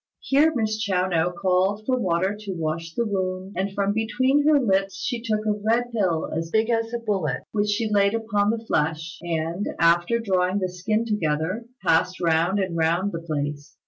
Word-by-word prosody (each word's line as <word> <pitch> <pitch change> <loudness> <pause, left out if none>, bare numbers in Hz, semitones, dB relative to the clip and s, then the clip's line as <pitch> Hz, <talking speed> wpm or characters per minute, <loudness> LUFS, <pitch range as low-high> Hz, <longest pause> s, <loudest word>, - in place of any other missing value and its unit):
Here 290 +4 +3
Miss 215 -2 0
Chiao 185 -4 +1
no 170 -1 +1
called 190 +3 0
for 255 - +2
water 190 -3 0
to 205 -3 -6
wash 165 0 -3
the 235 - 0
wound, 190 -1 -3
and 190 +2 -1
from 200 +1 0
between 260 +6 +1
her 305 -2 +6
lips 195 -5 +1
she 240 -4 -2
took 215 -2 -1
a 215 - +2
red 225 +4 0
pill 185 -8 0
as 165 0 -3
big 220 +4 +1
as 225 0 0
a 240 - -1
bullet, 195 - -2
which 210 -1 0
she 220 +2 0
laid 200 0 +2
upon 210 -2 0
the 225 0 -2
flesh, 160 0 -1
and, 170 +2 -2
after 175 +6 +3
drawing 190 -4 +1
the 185 -2 -1
skin 215 +5 -1
together, 185 +1 -1 0.2
passed 170 +3 +2
round 170 +3 +2
and 190 -4 -1
round 170 +5 +1
the 165 - -5
place. 145 -3 -4
195 Hz, 190 wpm, -24 LUFS, 170-220 Hz, 0.2 s, her